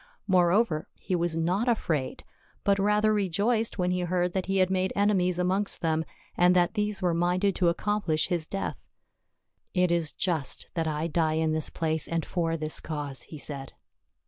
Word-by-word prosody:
Moreover, 180 -2 +2
he 185 - -3
was 170 -1 -1
not 180 +8 0
afraid, 160 - -1 0.4
but 200 0 +3
the - - 0
rather 210 +1 +3
rejoiced 210 +4 0
when 180 -1 +1
he 180 - 0
heard 180 0 0
that 190 -1 -2
he 195 0 0
had 185 0 +3
made 185 0 +1
enemies 190 -3 +2
amongst 185 +3 0
them, 160 -1 0 0.3
and 180 +1 +4
that 175 -1 +3
these 210 -2 -1
were 175 -2 +2
minded 180 +3 +1
to 175 -2 +3
accomplish 175 -3 0
his 170 -3 -1
death. 195 - -4 0.5
" - - -49
It 180 - +2
is 170 -3 +1
just 160 -7 -2
that 165 -2 -1
I 155 0 -1
die 160 -1 +1
in 160 0 +1
this 155 -1 0
place 160 -1 -2
and 165 -1 -1
for 165 -2 -1
this 155 -1 -1
cause," 145 -5 -3
he 155 - -8
said. 140 -1 -6
175 Hz, 185 wpm, -28 LUFS, 160-195 Hz, 0.5 s, and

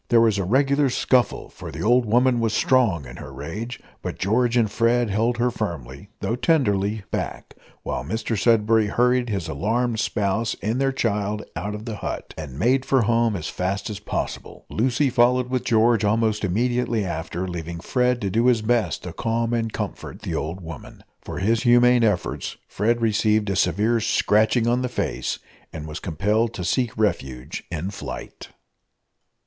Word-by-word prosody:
There 120 - +5
was 110 -3 +3
a - - 0
regular 140 +7 +2
scuffle, 125 -2 +1
for 85 -3 -9
the 80 +3 -5
old 120 +2 +4
woman 120 +3 +3
was 115 -2 0
strong 110 - +2
in 60 -1 -10
her - - -9
rage, 90 - -6 0.2
but - - -5
George 120 +4 +1
and 115 - +4
Fred 120 -1 +2
held 115 +4 +1
her 120 +1 +1
firmly, 85 - -5
though 115 - 0
tenderly, 105 - +1
back, - - -4 0.3
while - - -3
Mr 110 - -2
Sudberry 110 0 +3
hurried 125 +2 +2
his 95 -6 -2
alarmed 110 - 0
spouse 105 +3 0
and 115 +6 0
their 135 0 +2
child 105 -4 -1
out 105 +1 -3
of 105 +1 -8
the 110 -3 -5
hut, - - -5
and 75 -5 -7
made 125 - +2
for 135 -2 +2
home 115 0 +2
as 80 -5 -4
fast 95 +4 -2
as 105 - -6
possible. 105 - -5
Lucy 130 +4 +1
followed 125 +1 +3
with 130 -1 0
George 115 -1 +3
almost 110 0 +1
immediately 115 +2 0
after, 85 +1 -4
leaving 85 -1 -5
Fred 125 +6 +1
to 100 -2 -1
do 115 +4 +2
his 120 -3 +3
best 110 -6 0
to 90 - -6
calm 115 +2 -1
and 115 -1 0
comfort - - -6
the - - -3
old 85 +5 -3
woman. 80 -5 -10 0.2
For - - -7
his 110 +5 +1
humane 120 0 +5
efforts 105 -6 -1
Fred 115 +4 0
received 105 -1 +2
a - - -1
severe 105 +6 +2
scratching 110 +1 +2
on 120 +1 +2
the 125 - -1
face, - - -2 0.3
and 75 -1 -7
was 75 +2 -6
compelled 105 +7 0
to 90 - -4
seek 120 +5 0
refuge 70 - -2
in 90 +3 -3
flight. 100 - -8
110 Hz, 175 wpm, -23 LUFS, 95-120 Hz, 0.3 s, There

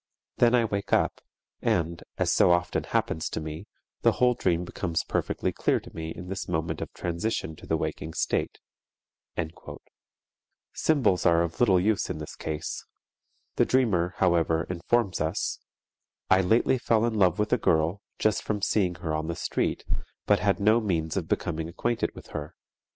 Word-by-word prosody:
Then 120 0 +5
I 120 -2 +3
wake 100 -2 -3
up - - +2 0.4
and, 85 +1 0 0.2
as - - +2
so - - +5
often 85 0 +1
happens 80 - -1
to - - -3
me, 80 0 -6 0.3
the - - +4
whole 125 0 +3
dream 90 -6 0
becomes 85 -2 -2
perfectly - - -1
clear - - +1
to - - -14
me 80 0 -4
in 85 +2 -7
this 95 0 -4
moment 80 -1 -2
of - - -5
transition 85 -1 -2
to - - -13
the - - +1
waking 80 0 -4
state._" 80 -1 -5 0.9
Symbols 130 - +2
are 85 0 +5
of 85 -1 -5
little 95 -7 +5
use 105 +2 +1
in - - -3
this 75 -1 -7
case. 80 0 -4 0.7
The - - +5
dreamer, 95 -9 +2
however, 85 -3 +2
informs 95 +2 0
us, 80 +5 -1 0.7
"I 95 0 +6
lately 115 +7 +3
fell 115 -2 +2
in 120 - 0
love 95 -4 +3
with 105 +2 0
a 125 - +3
girl, 85 +2 +2 0.2
just 110 -1 +1
from 105 -1 -2
seeing 95 -5 +2
her 80 - 0
on 80 0 -1
the 85 - -2
street, - - -1 0.4
but 105 - +4
had 100 -1 +1
no 110 +3 +4
means 80 -6 -1
of - - -2
becoming 80 +1 -2
acquainted 120 +7 -1
with - - -12
her. 75 +3 -6
90 Hz, 170 wpm, -27 LUFS, 80-105 Hz, 0.9 s, I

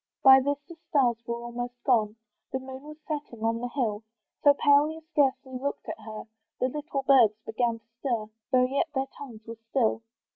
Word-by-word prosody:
By 265 -1 +10
this 285 +2 0
the 340 - -9 0.2
stars 250 -5 +3
were 235 - -1
almost 245 +1 -5
gone, 220 -4 +2 0.4
The - - 0
moon 260 0 -8
was 300 +1 -11
setting 290 -7 -5
on 230 0 +1
the 245 - -2
hill, 225 -6 -1 0.4
So 285 -1 +7
pale 285 +1 +5
you 320 +1 -7
scarcely 265 -3 +1
looked 280 +2 -4
at - - -5
her: 215 0 -8 0.4
The 255 - +1
little 290 0 -4
birds 240 -6 +5
began 230 +1 0
to 225 - -26
stir, 235 -6 -2 0.2
Though 255 -1 +5
yet 275 +5 0
their 265 0 +1
tongues 230 -6 -10
were 230 0 -8
still. 230 -4 +1
255 Hz, 190 wpm, -27 LUFS, 230-280 Hz, 0.4 s, By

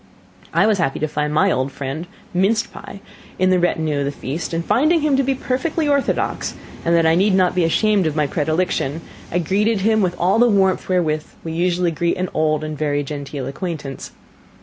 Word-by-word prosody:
I 170 +5 +3
was 215 -3 +2
happy 135 -5 0
to 155 - -1
find 150 0 -2
my 185 +6 +3
old 130 +1 -1
friend, 140 +5 -5 0.3
minced 210 +6 +1
pie, 200 - -10 0.4
in 185 0 +3
the 185 - +4
retinue 160 -4 0
of 140 - 0
the 140 - -1
feast; 145 +3 -5
and 165 0 -2
finding 310 +6 +3
him 295 -2 +2
to 270 - +3
be 270 0 0
perfectly 295 +5 -1
orthodox, 280 -1 0 0.3
and 170 0 +2
that 165 -1 +3
I 160 - +5
need 190 +3 +3
not 185 -2 +3
be 180 - +1
ashamed 200 +2 +2
of 155 - -2
my 150 -1 +2
predilection, 155 0 -1 0.3
I 175 - 0
greeted 200 +5 +1
him 220 +2 +3
with 180 -2 -1
all 185 +6 +3
the 240 0 +5
warmth 190 -3 +2
wherewith 155 -4 +1 0.2
we 165 - -5
usually 175 +1 +1
greet 170 +2 -1
an 185 0 -2
old 155 -1 +1
and 155 0 -4
very 145 -1 -1
genteel 140 -1 -5
acquaintance. 140 -1 -5
175 Hz, 205 wpm, -20 LUFS, 155-195 Hz, 0.4 s, I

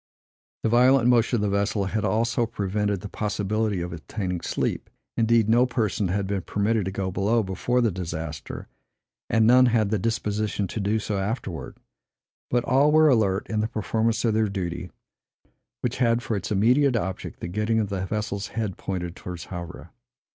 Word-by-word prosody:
The 115 - +2
violent 125 +2 +5
motion 120 0 +3
of 115 - 0
the 105 - +1
vessel 100 0 0
had 105 +2 -2
also 115 +3 +1
prevented 105 -2 -1
the 105 - -6
possibility 105 -1 -1
of 85 0 -4
obtaining 90 +1 -4
sleep; - - -2 0.3
indeed, 115 -1 +3
no 120 +3 +4
person 110 -5 0
had 100 +2 -1
been 100 0 -2
permitted 105 +2 0
to 95 - -2
go 95 -1 -2
below 105 +5 +1
before 105 +6 0
the 115 -3 +2
disaster; 80 -4 -6 0.6
and 110 -1 +3
none 125 +2 +6
had 110 -4 +2
the 110 - +1
disposition 105 -1 -1
to - - -4
do 105 +2 +1
so 105 -2 -2
afterwards; 95 -4 -4 0.7
but 120 -1 +1
all 140 +3 +4
were 155 0 +6
alert 105 -6 +2
in 110 - -1
the 110 - +1
performance 115 +1 0
of 115 - +2
their 110 -1 +2
duty, 90 -2 -4 0.9
which 125 0 -2
had 120 -1 +2
for 110 - -2
its 100 +1 -4
immediate 125 +6 +3
object 95 -4 -3
the - - -5
getting 105 +5 0
of 105 -3 -1
the 95 -2 -2
vessel's 100 0 -3
head 110 -5 -3
pointed 90 -2 -4
towards 90 -3 -7
Havre. 85 -1 -8
105 Hz, 175 wpm, -25 LUFS, 95-115 Hz, 0.9 s, none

